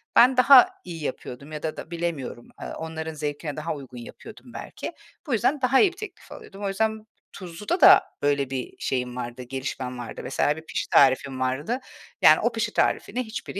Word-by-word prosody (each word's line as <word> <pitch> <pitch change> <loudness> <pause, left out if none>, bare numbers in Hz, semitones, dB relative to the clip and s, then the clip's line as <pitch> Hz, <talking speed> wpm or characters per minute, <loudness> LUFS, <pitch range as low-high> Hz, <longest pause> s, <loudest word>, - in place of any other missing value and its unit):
ben, 250 +2 +6
daha 255 0 +8
iyi 165 -3 -7
yapıyordum 140 +1 -6
ya 150 -1 -6
da 155 - -3
da 160 - -9
bilemiyorum, 165 -8 -4
eee, - - -5
onların 160 0 -5
zevkine 150 0 -4
daha 155 +1 -3
uygun 130 -3 -10
yapıyordum 120 - -12
belki. - - -7 0.3
Bu 270 - -1
yüzden 260 +6 +1
daha 255 +1 +4
iyi 395 - +4
bir 360 - -18
teklif 430 -2 -10
alıyordum. 200 +1 -11
O - - 0
yüzden 220 +2 -1 0.3
tuzluda 195 - -4
da - - +9 0.2
böyle 140 -2 +1
bir 130 -2 -4
şeyim 125 -2 -2
vardı, 120 0 -6
gelişmem 130 0 -5
vardı. 120 - -7
Mesela 145 - 0
bir 160 - -10
pişi - - -4
tarifim 135 0 +4
vardı. 135 - -1 0.4
Yani, - - +7
o - - +1
pişi - - -2
tarifini 250 +1 0
hiçbiri 220 -3 -6
155 Hz, 185 wpm, -25 LUFS, 130-215 Hz, 0.4 s, da